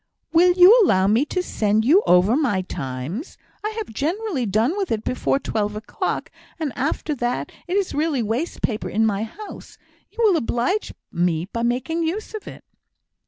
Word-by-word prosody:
"Will 355 +2 +6
you 365 +5 +8
allow 190 - +3
me 220 +8 +3
to 365 +4 -2
send 215 - +1
you 335 +10 +6
over 180 +6 +5
my 240 -11 +1
Times? 155 - -5 0.3
I 425 - -1
have 430 - -5
generally 320 - -1
done 220 - +1
with 400 -2 -2
it 220 -1 -1
before 255 - 0
twelve 210 -6 -2
o'clock, 220 +2 -3 0.3
and 300 -6 -2
after 300 +3 -1
that 245 -3 -2 0.2
it 365 +3 0
is 395 -2 -1
really 295 -4 0
waste 235 +10 -3
paper 215 -2 -1
in 220 +2 +2
my 205 -2 0
house. 400 - -9 0.3
You 430 - -31
will 400 -6 +5
oblige 250 - -1 0.2
me 170 -1 0
by 230 +4 -5
making 255 +8 -1
use 360 +8 -3
of 435 - -7
it." - - -10
250 Hz, 175 wpm, -22 LUFS, 215-350 Hz, 0.3 s, you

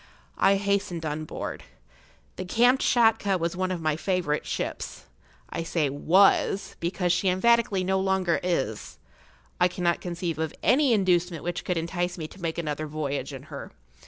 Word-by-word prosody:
I 195 - +5
hastened 195 -4 -1
on 155 +1 -3
board. - - -6 0.7
The - - -5
Kamtschatka 230 -2 +3
was 170 0 -2
one 185 0 -1
of 175 -3 -3
my 155 -1 +1
favourite 170 -3 -1
ships. - - -4 0.5
I 165 - -3
say 165 -4 0
was, 190 +6 +3
because 175 +1 0
she 185 +1 +1
emphatically 205 0 +3
no 190 +1 +1
longer 190 -2 +1
is. 110 - -2 0.6
I 180 - +5
cannot 175 -1 -1
conceive 170 -2 -3
of 160 -1 -2
any 275 0 +4
inducement 180 -5 +1
which 175 0 -3
could 180 - -1
entice 175 +2 -2
me 160 -2 -5
to 190 - -14
make 165 -1 -2
another 155 -2 -3
voyage 145 -2 -3
in 135 -1 -8
her. 140 - -8
175 Hz, 160 wpm, -26 LUFS, 160-190 Hz, 0.7 s, I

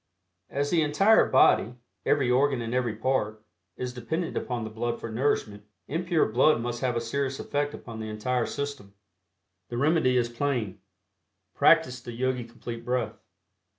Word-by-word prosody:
As 145 +1 -1
the 170 - +3
entire 175 +9 +4
body, 120 +3 +4 0.3
every 135 -4 +3
organ 135 +1 +3
and 115 0 -4
every 125 -3 0
part, 110 -5 -1 0.3
is 125 -1 -4
dependent 160 +8 -3
upon 120 -3 -2
the 110 - -6
blood 120 +2 -3
for 115 - -6
nourishment, 110 -4 -1 0.2
impure 170 +2 +1
blood 120 +5 +3
must 120 0 -4
have 125 -2 0
a - - +1
serious 135 +3 -2
effect 145 0 -2
upon 115 -2 -9
the 110 0 -5
entire 115 +3 -1
system. 140 -9 -5 0.7
The 120 - -4
remedy 140 -2 +3
is 120 -1 +2
plain 120 -5 -2 0.7
practice 125 -1 +4
the 120 -1 -8
Yogi 125 0 -1
Complete 115 0 -8
Breath. 120 -3 -2
125 Hz, 155 wpm, -27 LUFS, 115-140 Hz, 0.7 s, entire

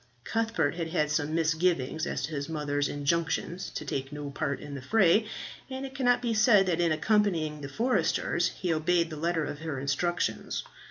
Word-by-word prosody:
Cuthbert 225 -10 0
had 165 -2 -2
had 155 -3 0
some 155 0 0
misgivings 160 -2 +1
as - - -2
to 145 - -3
his 140 -1 -3
mother's 145 -2 -1
injunctions 170 +4 -1
to 150 - -4
take 135 0 -3
no 145 -1 -5
part 140 0 -2
in 145 - -8
the 140 - -5
fray, 200 - +4 0.4
and 265 +1 -4
it 265 - -8
cannot 245 -2 +2
be 235 -2 +1
said 215 -2 +5
that 175 -2 +1
in 170 -2 +3
accompanying 160 -3 +1
the 140 - -6
foresters 175 - +1
he 180 -2 -2
obeyed 170 +1 +1
the - - -4
letter 165 0 0
of 145 - -5
her 155 -4 -4
instructions. 175 +6 -1
165 Hz, 185 wpm, -29 LUFS, 150-185 Hz, 0.4 s, said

